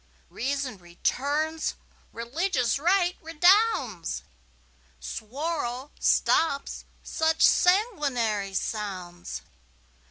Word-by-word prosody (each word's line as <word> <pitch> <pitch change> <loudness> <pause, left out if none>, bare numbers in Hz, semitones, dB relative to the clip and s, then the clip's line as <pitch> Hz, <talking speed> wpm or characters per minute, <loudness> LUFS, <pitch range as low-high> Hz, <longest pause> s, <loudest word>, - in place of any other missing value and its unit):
Reason 270 -4 -2
returns, 285 - -1 0.4
religious 250 - 0
right 355 +2 +2
redounds, 325 - +2 0.8
Suwarrow 265 +2 -4
stops 300 -4 +2 0.2
such 320 0 +2
sanguinary 275 - +2
sounds. 185 -5 -4
280 Hz, 60 wpm, -27 LUFS, 220-330 Hz, 0.8 s, right